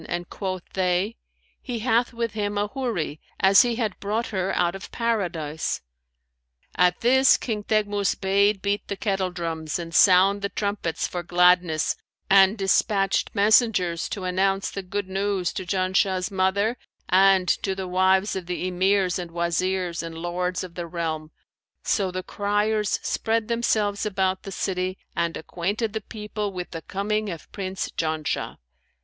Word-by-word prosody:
and 175 0 -4
quoth 185 -3 -4
they, 185 +3 0 0.5
'He 245 -2 -4
hath 240 0 +2
with 230 -1 -2
him 205 -1 -2
a 205 - +1
Houri, 220 - -3 0.2
as 195 +1 +7
he 240 -2 +1
had 220 -5 -2
brought 215 +3 -1
her 190 -2 -1
out 175 -1 +2
of 195 -1 -9
Paradise.' 175 -10 -2 0.9
At 180 +1 +2
this, 265 +2 +5
King 215 -4 -3
Teghmus 205 -2 +1
bade 200 +1 +2
beat 200 0 -1
the 200 - -4
kettledrums 175 -6 -2
and 165 -1 -7
sound 195 +3 +5
the 200 - -1
trumpets 200 -6 -2
for 175 - -4
gladness, 175 -2 +3 0.4
and 195 +2 +6
despatched 195 0 +2
messengers 200 -5 +3
to 195 - -5
announce 195 +2 0
the 195 - -4
good 190 +1 -4
news 195 -1 -1
to 185 - -5
Janshah's 185 0 +1
mother 200 +5 +1 0.3
and 190 0 +5
to 190 +1 0
the 190 -1 -4
wives 190 +2 +2
of 185 -2 -5
the 180 0 -2
Emirs 185 0 +2
and 175 -1 -5
Wazirs 175 +1 -1
and 165 -1 -7
Lords 180 +2 -2
of 180 -2 -9
the 170 -1 -5
realm: 160 -2 -3 0.5
so 195 -3 +1
the 185 0 -4
criers 210 +2 0
spread 225 0 -1
themselves 215 -3 +1
about 190 -2 0
the 195 - -8
city 185 -1 -2 0.2
and 170 -1 -1
acquainted 200 +7 -3
the 220 - -2
people 210 0 -5
with 180 -2 -6
the 165 - -6
coming 210 +3 -2
of 170 -3 -8
Prince 190 -2 -4
Janshah. 155 -1 -2
190 Hz, 155 wpm, -24 LUFS, 180-205 Hz, 0.9 s, as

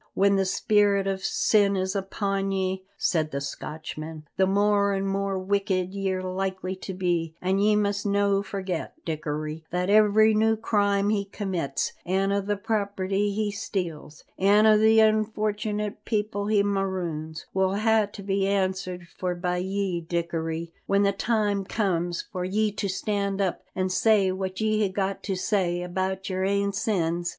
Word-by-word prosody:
"When 200 0 +4
the 195 0 +2
spirit 200 +1 +2
o' 195 -1 0
sin 200 +1 +2
is 190 +1 -1
upon 195 0 -1
ye," 190 0 -2
said 155 -3 +1
the 140 - -3
Scotchman, 155 +2 -6
"the 190 0 +3
more 200 +1 +3
an' 195 0 -1
more 195 0 -1
wicked 190 -1 0
ye're 190 -2 -2
likely 190 0 -3
to 190 0 -6
be; 170 -3 -1
an' 190 +2 0
ye 210 +1 +4
must 205 -1 0
no' 200 0 +2
forget, 190 -4 -4
Dickory, 155 0 -4
that 180 +2 0
every 215 +1 +5
new 220 +1 +3
crime 205 -2 +1
he 205 -2 +1
commits, 185 -8 -2
an' 195 +2 +1
a' 200 0 +1
the 205 +1 -2
property 200 -1 -1
he 210 0 -1
steals, 170 -7 -5 0.2
an' 205 +3 +5
a' 215 -1 +7
the 220 +1 +5
unfortunate 215 -1 0
people 210 -2 -1
he 210 -1 +3
maroons, 180 -6 -2
will 190 0 +1
hae 220 0 +3
to 200 - -9
be 195 0 0
answered 185 -2 -1
for 180 -1 -1
by 180 0 -1
ye, 190 -1 -1
Dickory, 165 -1 -3
when 200 0 +3
the 200 - +3
time 205 -1 0
comes 175 -4 -1
for 185 -3 -5
ye 210 +3 +1
to 200 0 -3
stand 200 +1 -1
up 190 -3 0
an' 185 0 0
say 200 0 +3
what 190 0 -4
ye 215 -1 +1
hae 205 -2 +2
got 195 0 -2
to 195 - -2
say 180 -2 0
about 190 +1 -2
your 185 -1 -1
ain 200 +1 +1
sins. 175 -5 0
195 Hz, 165 wpm, -26 LUFS, 185-205 Hz, 0.2 s, a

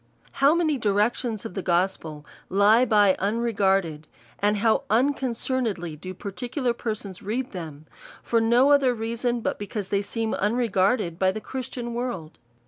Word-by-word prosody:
How 280 +4 +3
many 310 -5 +1
directions 215 +1 0
of - - -6
the 195 - -3
gospel 170 -4 -1 0.2
lie 210 +5 +5
by 205 -4 +4
unregard 200 -3 +1
ed; 155 -1 -9 0.3
and 205 +1 +2
how 220 +2 +2
unconcernedly 235 - 0
do 185 +5 -8
particular 240 - -3
persons 215 -5 -5
read 240 +6 -3
them; 155 -5 -8 0.4
for 230 -1 +1
no 240 +5 +4
other 270 -4 +4
reason^ 235 +1 -2
but - - -2
because 205 -1 -5
they 200 0 +1
seem 225 +2 -3
unregarded 205 -4 +1
by 190 0 +3
the 215 - -5
Christian 245 0 -6
world 235 -10 -5
215 Hz, 145 wpm, -25 LUFS, 190-245 Hz, 0.4 s, lie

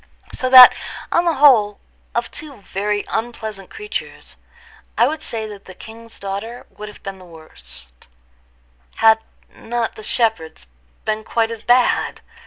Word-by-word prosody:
So 255 - -2
that, 255 -1 +11 0.4
on 340 - +2
the 335 -2 +2
whole, 235 -8 +5 0.4
of - - -2
two 280 -10 -10
very 205 +2 -2
unpleasant 220 -4 -4
creatures, 420 -1 -6 0.6
I - - +5
would 310 +1 -3
say 225 -1 -3
that 205 -2 -10
the 185 - -12
king's 230 +1 -12
daughter 200 +5 -6
would 210 - -8
have 210 - -15
been 195 -1 -7
the - - -14
worse, 160 - -12 1.1
had 220 0 +5 0.3
not 235 0 -3
the - - -10
shepherd's 215 - -1 0.4
been 215 0 -2
quite 225 0 0
as 225 -2 -7
bad. 245 +1 +2
220 Hz, 145 wpm, -19 LUFS, 205-240 Hz, 1.1 s, that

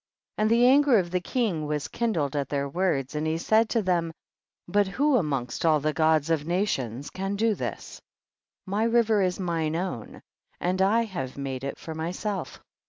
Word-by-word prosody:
51. - - +3
And 215 - +3
the 235 +2 +5
anger 275 -1 +5
of 175 -3 0
the 180 - +1
king 185 - -1
was 150 -4 -2
kindled 165 - -1
at 140 -1 -1
their 140 -1 -1
words, 140 -4 -1
and 150 +1 -2
he 160 +1 0
said 220 +6 +2
to 230 -3 +1
them, 175 -3 0 0.6
but 200 +2 +2
who 280 +8 +2
amongst 140 - -1
all 155 -2 +4
the 155 +1 -1
Gods 155 0 +2
of 155 -3 +1
nations 145 - -2
can 195 +1 -3
do 220 +2 +2
this? - - -6 0.6
my* 200 +3 -1
river 230 -2 +3
is 185 0 0
mine 165 -4 -1
own, 170 - -5 0.4
and 185 +2 0
I 215 +5 +4
have 155 - -5
made 135 -2 -4
it 140 - -4
for 160 - -7
myself. 175 - -4
175 Hz, 185 wpm, -26 LUFS, 150-210 Hz, 0.6 s, the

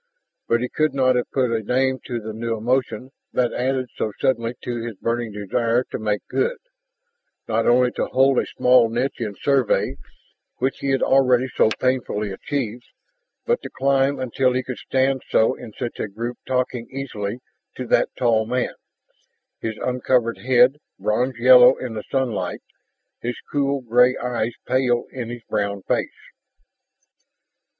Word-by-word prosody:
And 120 +1 +2
he - - 0
could 155 -2 0
not 130 -1 +3
have 125 - -1
put 130 -3 +1
a 115 -1 0
name 130 +4 +1
to 120 -2 -3
the 110 0 -7
new 115 +1 -3
emotion 125 +2 -1 0.2
that 125 -2 +1
added 130 0 -1
so 110 - -2
suddenly 115 -2 0
to 120 -1 -3
his 115 -2 -5
burning 115 +1 -2
desire 115 +4 0
to - - -3
make 105 -2 -2
good, 485 +2 0 0.9
not 115 0 0
only 125 +1 +4
to - - -2
hold 135 0 +3
the - - -2
small 125 -2 +4
niche 125 +3 -2
in 105 -3 -3
Survey 135 -5 +1 0.6
which 130 +2 -1
he 140 - -2
had 135 -1 +2
already 130 -2 +4
so - - +4
painfully 120 -5 -1
achieved, 120 +2 -4 0.6
but 475 0 +1
to - - -7
climb, 135 +1 +1
until 130 0 +1
he 130 +1 0
could 125 -1 -6
stand 135 0 0
so 110 - +3
in 110 - -10
such 120 +1 -5
a - - -2
group 115 +4 -5
talking 125 -2 -1
easily 120 -6 -4 0.4
to 130 - -5
that - - +2
tall 115 -3 +2
man, 125 +1 -1 0.9
his 110 -1 -4
uncovered 125 -2 0
head 125 +2 +4 0.2
bronze 110 +6 0
yellow 125 +1 +7
in 125 -3 -5
the 110 - -4
sunlight, 130 -5 -2 0.6
his 120 +1 -3 0.2
cool 140 -1 0
gray 125 +1 +4
eyes 120 -2 -2
pale 125 -2 +1
in 120 -3 -5
his 120 -1 -7
brown 100 -2 -2
face. - - -3
125 Hz, 160 wpm, -22 LUFS, 115-130 Hz, 0.9 s, yellow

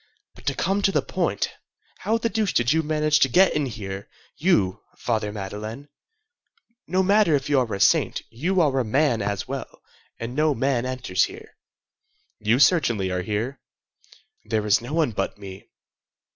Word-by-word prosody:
"But 120 - -17
to 140 - +1
come 195 +7 0
to 195 - +3
the - - +1
point, - - -1 0.5
how 225 - +1
the 230 - -1
deuce 220 -3 -1
did 120 +4 +3
you 160 - +2
manage 155 -1 +1
to 135 - +4
get 185 +9 +5
in 150 -2 0
here, 100 -4 -7 0.3
you, 105 - +1 0.2
Father 110 -3 -1
Madeleine? 105 +7 -7 1.0
No 185 +1 +1
matter 200 -4 +4
if 140 +1 -2
you 140 - +5
are 120 -3 -1
a 100 - -3
saint; 100 - +3
you 175 +11 0
are 140 -4 +2
a - - +1
man 125 0 +1
as 100 -1 -2
well, 135 +1 -7 0.3
and 115 +1 -5
no 150 +1 +2
man 130 -2 0
enters 130 0 0
here." 430 +3 -12 0.8
"You 110 +2 +2
certainly 120 - +3
are 90 0 -1
here." 110 +8 -3 0.8
"There 110 -1 -1
is 105 +1 +3
no 120 +4 -8
one 155 -5 +1
but 100 -1 -3
me." 95 -1 -11
130 Hz, 170 wpm, -24 LUFS, 105-155 Hz, 1.0 s, get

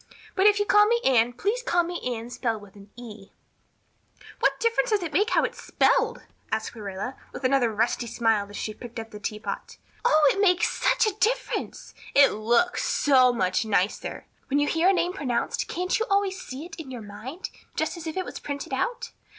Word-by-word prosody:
But 390 0 +4
if 415 -1 +5
you 410 - +1
call 415 0 +5
me 470 +2 +2
Anne 245 -2 +4
please 410 - -1
call 350 -7 +2
me 345 +1 -5
Anne 240 -1 -4
spelled 225 -4 -2
with 200 0 -16
an 200 0 -14
E." 215 -5 -11 1.1
"What - - +2
difference 465 +2 +1
does 420 -4 +1
it 320 -3 -5
make 410 +8 +3
how - - +3
it's - - -3
spelled?" - - +1 0.3
asked 220 +2 -2
Marilla 205 +4 -5 0.2
with - - -9
another 255 -3 +3
rusty 230 +2 0
smile 220 -3 +1
as 205 - -8
she 215 - -4
picked 240 +1 -9
up 225 0 -8
the 210 - -9
teapot. 210 +1 -5 0.3
"Oh, 310 -10 +5
it 395 - -1
makes 360 -3 +4
such - - +2
a 430 - 0
difference. - - -1 0.2
It 280 -1 +7
looks 235 - +1
so 260 -3 +4
much 185 -5 0
nicer. 200 -2 -1 0.2
When 280 - +1
you 290 0 +2
hear 330 +4 +3
a - - +5
name 360 -1 0
pronounced 380 - -2
can't 365 +3 -1
you 450 - -1
always 395 -1 +1
see 270 +5 -7
it 355 - -10
in 320 -5 -8
your 245 -4 -7
mind, 220 - -8 0.2
just - - -1
as 335 -2 -8
if 320 - -5
it 370 - -1
was - - -7
printed 285 -1 -5
out? 475 - -2
275 Hz, 205 wpm, -26 LUFS, -, 1.1 s, It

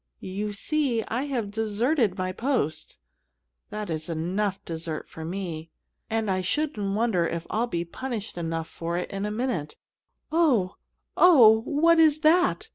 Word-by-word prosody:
You 210 +2 -2
see, 245 +2 0
I 250 +5 -1
have 240 -8 -3
deserted 220 - 0
my 185 0 -2
post 185 - -2 0.7
that 210 0 -5
is 160 0 -4
enough 185 +5 -1
dessert 160 -1 -5
for 160 - -9
me, 165 -2 -5 0.4
and 225 -1 -1
I 185 0 0
shouldn't 205 -3 -1
wonder 210 -7 +1
if 170 0 -4
I'd 235 +3 0
be 170 -3 -2
punished 225 +3 -5
enough 165 -1 -3
for 170 +1 -4
it 180 - -4
in 195 +1 -3
a - - -2
minute 215 - -2 0.6
Oh! 270 - +2 0.4
Oh! 235 -11 +7
what 325 +4 +4
is 310 -1 +4
that! 355 +7 +3
210 Hz, 150 wpm, -26 LUFS, 175-260 Hz, 0.7 s, Oh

